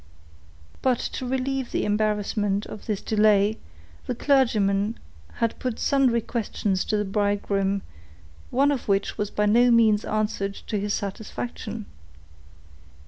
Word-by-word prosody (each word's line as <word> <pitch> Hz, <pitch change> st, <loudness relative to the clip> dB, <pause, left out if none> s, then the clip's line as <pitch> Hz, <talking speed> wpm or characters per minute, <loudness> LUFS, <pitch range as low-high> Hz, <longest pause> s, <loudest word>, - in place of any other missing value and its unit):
But 255 Hz, -2 st, +3 dB
to 255 Hz, -, -4 dB
relieve 265 Hz, 0 st, -1 dB
the -, -, 0 dB
embarrassment 210 Hz, -1 st, 0 dB
of 215 Hz, -, -10 dB
this 210 Hz, -3 st, -1 dB
delay, 210 Hz, -1 st, +3 dB, 0.5 s
the 250 Hz, -, -1 dB
clergyman 220 Hz, -6 st, +2 dB, 0.4 s
had 230 Hz, -1 st, -1 dB
put 250 Hz, -3 st, -2 dB
sundry 260 Hz, -4 st, +2 dB
questions 205 Hz, -4 st, -1 dB
to 215 Hz, -, 0 dB
the 210 Hz, -, 0 dB
bridegroom; 200 Hz, -1 st, 0 dB, 0.7 s
one 280 Hz, +3 st, +3 dB
of 270 Hz, -4 st, -3 dB
which 200 Hz, 0 st, 0 dB
was 210 Hz, -1 st, -1 dB
by 210 Hz, -, 0 dB
no 235 Hz, +4 st, +5 dB
means 225 Hz, -3 st, +4 dB
answered 210 Hz, -2 st, -1 dB
to 210 Hz, -, -4 dB
his 205 Hz, 0 st, -1 dB
satisfaction. 215 Hz, +2 st, -5 dB
215 Hz, 130 wpm, -25 LUFS, 205-235 Hz, 0.7 s, no